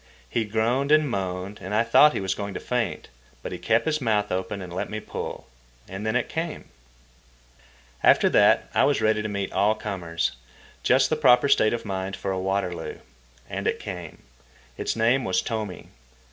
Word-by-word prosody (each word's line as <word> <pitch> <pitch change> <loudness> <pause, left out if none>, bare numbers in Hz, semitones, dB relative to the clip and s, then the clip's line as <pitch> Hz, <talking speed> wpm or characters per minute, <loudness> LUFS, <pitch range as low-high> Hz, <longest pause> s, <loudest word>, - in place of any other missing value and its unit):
He 115 -2 -1
groaned 115 +7 0
and 155 -1 +5
moaned, 95 -3 -4
and 95 +4 -3
I 110 - +4
thought 150 +6 +6
he - - -2
was 95 -1 0
going 100 -1 -5
to - - -3
faint. 125 -2 -2 0.4
But - - -5
he - - -5
kept 115 +1 +2
his 155 -1 0
mouth 105 -4 +1
open 95 +2 -2
and 90 -2 -8
let 90 - -3
me 110 - -4
pull. - - -6 0.4
And 95 +3 -5
then 110 - 0
it 125 - +1
came. 165 0 -5 1.3
After - - +5
that - - +4
I - - +3
was 145 - +3
ready 110 0 +2
to 105 - -3
meet 100 -1 -3
all 105 +2 +3
comers—just 85 - -2
the - - +3
proper 125 +3 +5
state 110 -5 +4
of 120 - -4
mind 95 -1 -3
for 95 +1 -4
a 95 - -2
Waterloo. 95 -2 -2 0.5
And - - -4
it - - 0
came. 90 -5 -8 0.5
Its - - -2
name 120 +4 +2
was 95 -3 +1
Tomi. 105 -1 -4
105 Hz, 185 wpm, -25 LUFS, 95-115 Hz, 1.3 s, thought